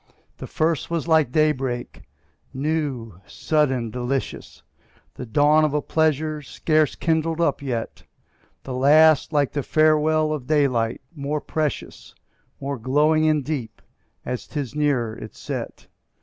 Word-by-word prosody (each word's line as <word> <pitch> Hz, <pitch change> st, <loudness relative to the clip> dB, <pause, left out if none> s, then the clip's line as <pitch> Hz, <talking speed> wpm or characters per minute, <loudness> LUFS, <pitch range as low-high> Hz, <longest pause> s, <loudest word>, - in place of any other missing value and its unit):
The -, -, -7 dB
first 160 Hz, 0 st, -1 dB
was 170 Hz, -1 st, -2 dB
like 160 Hz, -6 st, +3 dB
day 155 Hz, +2 st, +4 dB
break, 130 Hz, -3 st, -5 dB, 0.5 s
new, 135 Hz, -, -3 dB
sudden, 130 Hz, -7 st, 0 dB
delicious, 125 Hz, +2 st, -4 dB, 0.5 s
The -, -, -8 dB
dawn 150 Hz, +6 st, +4 dB
of 150 Hz, -1 st, +1 dB
a 150 Hz, -, +1 dB
pleasure 155 Hz, -1 st, 0 dB
scarce 155 Hz, +1 st, 0 dB
kindled 165 Hz, 0 st, 0 dB
up 155 Hz, -5 st, +1 dB
yet; 120 Hz, -5 st, -4 dB, 0.6 s
The 130 Hz, -, -6 dB
last 150 Hz, +4 st, +5 dB
like 145 Hz, -3 st, +1 dB
the 145 Hz, -, -2 dB
farewell 155 Hz, +1 st, +2 dB
of 135 Hz, -5 st, -6 dB
daylight, 130 Hz, -7 st, +1 dB
more 150 Hz, 0 st, -3 dB
precious, 155 Hz, 0 st, -4 dB, 0.4 s
More 140 Hz, -1 st, -4 dB
glowing 150 Hz, +6 st, +2 dB
and 150 Hz, -3 st, +1 dB
deep, 135 Hz, -8 st, -4 dB, 0.5 s
as 125 Hz, -1 st, -4 dB
'tis 140 Hz, -5 st, -4 dB
nearer 135 Hz, -7 st, 0 dB
its 110 Hz, -2 st, -10 dB
set. -, -, -6 dB
150 Hz, 135 wpm, -23 LUFS, 130-155 Hz, 0.6 s, last